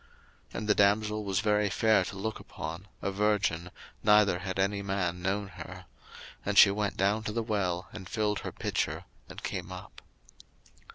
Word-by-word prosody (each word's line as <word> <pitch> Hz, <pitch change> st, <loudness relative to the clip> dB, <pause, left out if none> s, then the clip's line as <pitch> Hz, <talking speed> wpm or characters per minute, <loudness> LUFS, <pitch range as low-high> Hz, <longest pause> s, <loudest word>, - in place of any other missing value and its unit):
01:024:016 -, -, -7 dB
And 105 Hz, -, -3 dB
the 105 Hz, -, +5 dB
damsel 105 Hz, +1 st, +2 dB
was 95 Hz, -1 st, 0 dB
very 105 Hz, -1 st, +2 dB
fair 110 Hz, +2 st, +3 dB
to 95 Hz, -, -6 dB
look 110 Hz, +3 st, -3 dB
upon, 85 Hz, +5 st, -7 dB, 0.2 s
a 100 Hz, -, 0 dB
virgin, 100 Hz, -4 st, +1 dB, 0.3 s
neither 105 Hz, -4 st, +5 dB
had 95 Hz, +1 st, -4 dB
any 100 Hz, +1 st, +1 dB
man 95 Hz, -3 st, -1 dB
known 100 Hz, +2 st, -1 dB
her: -, -, -9 dB, 0.6 s
and 100 Hz, 0 st, -1 dB
she 100 Hz, -, +9 dB
went 105 Hz, 0 st, -1 dB
down 100 Hz, +3 st, +2 dB
to 110 Hz, -, -3 dB
the 115 Hz, +1 st, -1 dB
well, 95 Hz, -5 st, -1 dB
and 95 Hz, -4 st, -8 dB
filled 105 Hz, -2 st, 0 dB
her -, -, -5 dB
pitcher, -, -, -2 dB, 0.3 s
and -, -, -9 dB
came -, -, -4 dB
up. -, -, -10 dB
100 Hz, 175 wpm, -30 LUFS, 95-105 Hz, 0.6 s, she